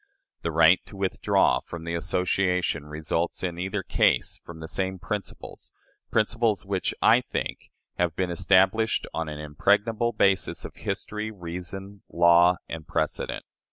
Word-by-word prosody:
The -, -, -2 dB
right 80 Hz, +2 st, +5 dB
to 100 Hz, -, -11 dB
withdraw 95 Hz, -1 st, +2 dB
from 85 Hz, -2 st, -9 dB
the 85 Hz, 0 st, -4 dB
association 90 Hz, -2 st, 0 dB
results, 80 Hz, +4 st, -2 dB
in 85 Hz, -2 st, -3 dB
either 95 Hz, +2 st, -2 dB
case, -, -, +1 dB
from 85 Hz, -1 st, -10 dB
the 80 Hz, -, -7 dB
same 95 Hz, +2 st, -2 dB
principles 105 Hz, +2 st, -6 dB, 0.4 s
principles 110 Hz, -1 st, +1 dB
which, 95 Hz, -1 st, -2 dB
I -, -, +6 dB
think, -, -, -5 dB, 0.3 s
have 85 Hz, -3 st, +1 dB
been 90 Hz, -1 st, -1 dB
established 95 Hz, +6 st, +3 dB
on 80 Hz, -1 st, -2 dB
an 75 Hz, -, -6 dB
impregnable 105 Hz, +10 st, +1 dB
basis 95 Hz, -4 st, +1 dB
of -, -, -8 dB
history, 105 Hz, +1 st, -4 dB
reason, 95 Hz, +1 st, -7 dB
law, 85 Hz, +1 st, +5 dB
and 80 Hz, -1 st, -7 dB
precedent. 80 Hz, -2 st, -2 dB
90 Hz, 140 wpm, -26 LUFS, 85-100 Hz, 0.4 s, I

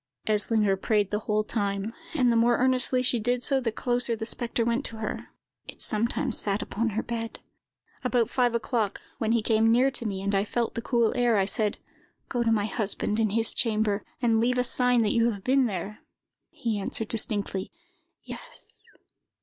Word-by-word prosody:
"Eslinger 210 Hz, -1 st, +2 dB
prayed 205 Hz, +1 st, 0 dB
the 210 Hz, -, 0 dB
whole 215 Hz, 0 st, 0 dB
time, 200 Hz, 0 st, -2 dB, 0.2 s
and 250 Hz, -5 st, +3 dB
the -, -, +2 dB
more 235 Hz, +1 st, +4 dB
earnestly 255 Hz, 0 st, +3 dB
she 245 Hz, -1 st, +2 dB
did 245 Hz, +2 st, 0 dB
so, 270 Hz, +1 st, +2 dB
the 235 Hz, -3 st, -1 dB
closer 240 Hz, +1 st, +1 dB
the 220 Hz, 0 st, -5 dB
spectre 235 Hz, 0 st, -2 dB
went 235 Hz, +3 st, 0 dB
to 225 Hz, -, -5 dB
her. 215 Hz, -1 st, -5 dB, 0.4 s
It -, -, -9 dB
sometimes 230 Hz, +2 st, +2 dB
sat 200 Hz, 0 st, 0 dB
upon 230 Hz, +2 st, -2 dB
her 220 Hz, +2 st, -2 dB
bed. 230 Hz, -1 st, -4 dB, 0.7 s
"About 245 Hz, -3 st, +2 dB
five 245 Hz, -2 st, +1 dB
o'clock, 225 Hz, -3 st, -1 dB, 0.2 s
when 220 Hz, 0 st, 0 dB
he 230 Hz, -2 st, +1 dB
came 225 Hz, 0 st, +3 dB
near 255 Hz, +4 st, +4 dB
to 240 Hz, -3 st, -2 dB
me, 195 Hz, -2 st, -4 dB
and 200 Hz, +1 st, -1 dB
I 195 Hz, 0 st, +2 dB
felt 235 Hz, +2 st, -2 dB
the 230 Hz, -, -3 dB
cool 235 Hz, -2 st, +1 dB
air, 240 Hz, -3 st, +3 dB
I 195 Hz, -, +3 dB
said, 210 Hz, +1 st, -1 dB, 0.5 s
'Go 245 Hz, -, -1 dB
to 230 Hz, -1 st, +2 dB
my 210 Hz, -2 st, +2 dB
husband, 210 Hz, +1 st, -2 dB
in 220 Hz, -1 st, +2 dB
his 225 Hz, +2 st, +2 dB
chamber, 215 Hz, -3 st, 0 dB, 0.2 s
and 225 Hz, -2 st, +3 dB
leave 250 Hz, +2 st, +1 dB
a 250 Hz, -, +2 dB
sign 250 Hz, -1 st, +3 dB
that 210 Hz, -, +1 dB
you 230 Hz, 0 st, +3 dB
have 200 Hz, -4 st, -5 dB
been 260 Hz, +1 st, +3 dB
there!' 200 Hz, +1 st, -5 dB, 0.5 s
He 225 Hz, -3 st, -3 dB
answered 210 Hz, +2 st, -3 dB
distinctly, 205 Hz, -4 st, -1 dB, 0.5 s
'Yes. -, -, -9 dB
225 Hz, 190 wpm, -27 LUFS, 210-240 Hz, 0.7 s, more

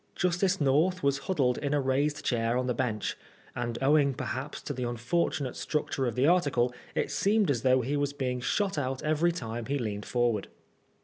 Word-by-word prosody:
Justice 180 Hz, +2 st, +1 dB
North 155 Hz, +6 st, +2 dB
was 140 Hz, 0 st, +2 dB
huddled 135 Hz, -9 st, +2 dB
in 145 Hz, 0 st, 0 dB
a -, -, +2 dB
raised 140 Hz, +3 st, 0 dB
chair 115 Hz, 0 st, +1 dB
on 125 Hz, -, 0 dB
the 125 Hz, -, 0 dB
bench, 115 Hz, -4 st, -2 dB, 0.4 s
and 120 Hz, -1 st, -3 dB
owing 140 Hz, -1 st, +4 dB
perhaps 135 Hz, +3 st, -4 dB
to 145 Hz, -, -4 dB
the 130 Hz, -, -6 dB
unfor« 120 Hz, +7 st, 0 dB
tunate 135 Hz, -5 st, -4 dB
structure 145 Hz, -3 st, -1 dB
of 115 Hz, -, -2 dB
the 130 Hz, -, +2 dB
article, 145 Hz, -8 st, +3 dB, 0.2 s
it -, -, 0 dB
seemed 200 Hz, +4 st, +2 dB
as 120 Hz, -5 st, -1 dB
though 130 Hz, 0 st, +4 dB
he 135 Hz, +5 st, -1 dB
was 145 Hz, -1 st, 0 dB
being 125 Hz, -3 st, -2 dB
shot 195 Hz, -, 0 dB
out 130 Hz, -1 st, -3 dB
every 155 Hz, +3 st, +2 dB
time 115 Hz, -8 st, -5 dB
he 140 Hz, +1 st, 0 dB
leaned 105 Hz, -5 st, -4 dB
forward. 120 Hz, -4 st, 0 dB
135 Hz, 195 wpm, -29 LUFS, 125-150 Hz, 0.4 s, owing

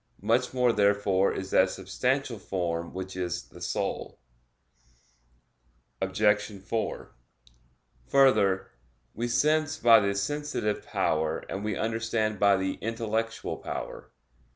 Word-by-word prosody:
Much 120 Hz, +4 st, +2 dB
more 125 Hz, -2 st, +2 dB
therefore 100 Hz, -2 st, +3 dB
is 95 Hz, 0 st, -5 dB
that 95 Hz, 0 st, +5 dB
substantial 120 Hz, +6 st, -2 dB
form 85 Hz, -3 st, -3 dB
which 95 Hz, 0 st, -6 dB
is 90 Hz, -4 st, -3 dB
the -, -, -14 dB
soul. -, -, -3 dB, 1.8 s
Obj. 105 Hz, +2 st, +2 dB
4: 110 Hz, +4 st, -3 dB, 1.0 s
Further, 105 Hz, -9 st, +3 dB, 0.4 s
we 120 Hz, +2 st, -2 dB
sense 155 Hz, +4 st, +2 dB
by 115 Hz, -5 st, +7 dB
the 100 Hz, -1 st, 0 dB
sensitive 145 Hz, -2 st, -2 dB
power 80 Hz, 0 st, 0 dB
and 100 Hz, -, -5 dB
we 105 Hz, -2 st, -1 dB
understand 110 Hz, -2 st, -1 dB
by 100 Hz, -1 st, +5 dB
the 95 Hz, 0 st, -2 dB
intellectual 115 Hz, 0 st, -2 dB
power. -, -, -6 dB
105 Hz, 110 wpm, -28 LUFS, 95-115 Hz, 1.8 s, by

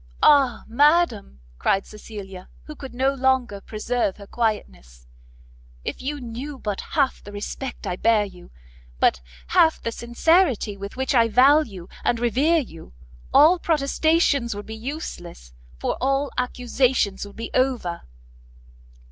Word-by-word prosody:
"Ah 270 Hz, -6 st, +5 dB
madam!" 265 Hz, -, +2 dB, 0.2 s
cried 195 Hz, 0 st, +1 dB
Cecilia, 200 Hz, -3 st, -10 dB
who 305 Hz, -, -10 dB
could 265 Hz, -3 st, -10 dB
no 265 Hz, +2 st, +2 dB
longer 260 Hz, -6 st, 0 dB
preserve 220 Hz, -1 st, -2 dB
her 200 Hz, -, -11 dB
quietness, 65 Hz, -, -3 dB, 0.8 s
"if -, -, -4 dB
you 290 Hz, +3 st, -3 dB
knew 255 Hz, +4 st, -7 dB
but 205 Hz, -5 st, -4 dB
half 280 Hz, -4 st, -1 dB
the 205 Hz, -, -10 dB
respect 210 Hz, +6 st, -6 dB
I 180 Hz, -, -3 dB
bear 220 Hz, -1 st, +3 dB
you, 180 Hz, -3 st, -13 dB, 0.5 s
but -, -, +3 dB, 0.3 s
half 320 Hz, -1 st, +4 dB
the 230 Hz, -, -3 dB
sincerity 240 Hz, -, +1 dB
with 200 Hz, 0 st, -8 dB
which 265 Hz, +1 st, -1 dB
I 230 Hz, -3 st, +5 dB
value 250 Hz, -, +3 dB, 0.2 s
and 235 Hz, -, +1 dB
revere 265 Hz, +8 st, +2 dB
you, 165 Hz, -, -6 dB, 0.4 s
all 315 Hz, +6 st, +6 dB
protestations 295 Hz, -5 st, +1 dB
would 205 Hz, -, -7 dB
be 220 Hz, -, -8 dB
useless, 220 Hz, -, -7 dB, 0.2 s
for -, -, -2 dB
all 275 Hz, +2 st, +1 dB
accusations 250 Hz, -4 st, 0 dB
would 200 Hz, -, -14 dB
be 230 Hz, -, -6 dB
over!" 250 Hz, -10 st, 0 dB
240 Hz, 135 wpm, -23 LUFS, 205-275 Hz, 0.8 s, all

